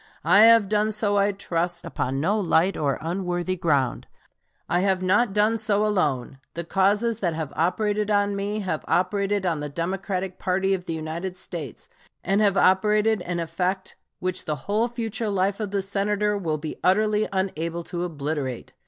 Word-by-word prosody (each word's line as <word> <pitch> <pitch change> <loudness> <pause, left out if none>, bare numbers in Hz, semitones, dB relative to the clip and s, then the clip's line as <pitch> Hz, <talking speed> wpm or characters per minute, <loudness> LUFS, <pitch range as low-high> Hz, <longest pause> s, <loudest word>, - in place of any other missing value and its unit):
I 200 - +6
have 230 -3 +6
done 210 +1 +1
so, 210 -1 0
I 200 +1 +3
trust, 175 -3 -2
upon 135 +2 -2
no 200 +9 +1
light 180 0 +2
or 140 -2 0
unworthy 175 +1 -2
ground. 145 -8 0 0.6
I 175 - +1
have 190 -1 +1
not 205 +4 +3
done 210 +3 +2
so 215 -1 +1
alone. 145 - 0 0.2
The 170 - -3
causes 205 +6 +1
that 175 -6 -1
have 155 -3 -4
operated 205 +5 0
on 205 -1 +2
me 205 +2 -2
have 180 -6 -3
operated 200 +2 +1
on 165 -4 0
the 150 0 -4
Democratic 185 +4 -3
party 190 +1 +1
of 180 -2 -3
the 165 - -3
United 165 +4 -5
States, 160 - -7 0.4
and 195 +3 +2
have 200 -2 +3
operated 210 +3 +3
an 175 -1 -3
effect 185 +3 -2 0.2
which 185 0 -3
the 155 - -1
whole 215 +3 +1
future 230 -2 -3
life 195 +1 0
of 210 -2 -2
the 200 -1 -1
Senator 205 +1 0
will 165 -6 -1
be 155 +1 -6
utterly 210 +3 +3
unable 170 -3 -2
to 175 +1 -4
obliterate. 145 -6 -4
190 Hz, 170 wpm, -24 LUFS, 170-205 Hz, 0.6 s, I